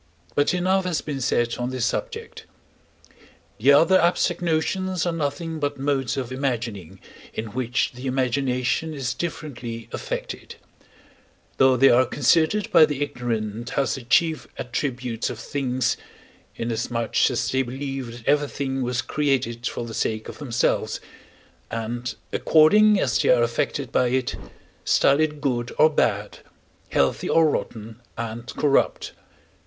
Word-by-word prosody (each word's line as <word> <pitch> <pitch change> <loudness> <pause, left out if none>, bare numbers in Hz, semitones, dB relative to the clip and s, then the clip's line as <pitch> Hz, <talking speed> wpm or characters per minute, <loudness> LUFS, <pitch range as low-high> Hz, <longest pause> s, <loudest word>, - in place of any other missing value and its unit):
But 145 - +2
enough 185 +1 +1
has 175 -4 0
been 140 -3 -4
said 120 -2 +1
on 120 +1 -1
this 130 -2 -1
subject. - - -4 1.1
The 130 +6 +5
other 165 +6 +6
abstract 175 0 +1
notions 175 +2 0
are 175 - +1
nothing 160 +1 -3
but 145 -1 -2
modes 135 -2 -1
of 130 -2 -3
imagining, 115 - -3 0.4
in 110 -1 -4
which 125 0 -1
the 125 +2 -7
imagination 130 +3 0
is 130 -3 -2
differently 125 -9 -5
affected: - - -5 1.0
though 130 -1 +5
they 135 +2 +6
are 125 +1 +4
considered 160 - +2
by 160 -2 +7
the 145 -1 -2
ignorant 120 -4 -4
as 140 - +2
the 135 - -5
chief 160 +6 +2
attributes 125 -2 -3
of - - -6
things, 130 +1 -1 0.6
inasmuch 115 0 0
as 125 - -1
they 130 - +2
believe 135 +1 -4 0.2
that - - -17
everything 140 -2 0
was 125 -1 -1
created 125 -6 -1
for 120 - -4
the 115 - -7
sake 110 0 -2
of - - -9
themselves; 130 -6 0 0.7
and, 120 +2 -4 0.2
according 205 +7 +5
as 120 -10 +1
they - - +1
are 120 -1 +5
affected 120 +2 -1
by 125 - +2
it, 130 0 0 0.5
style 140 +1 +3
it 155 -1 0
good 120 -4 -1
or 155 0 +6
bad, 105 -7 0 0.5
healthy 70 -1 +1
or 165 -1 +5
rotten 115 -5 -4 0.2
and 115 +1 -5
corrupt. 145 -2 +1
130 Hz, 140 wpm, -24 LUFS, 120-150 Hz, 1.1 s, by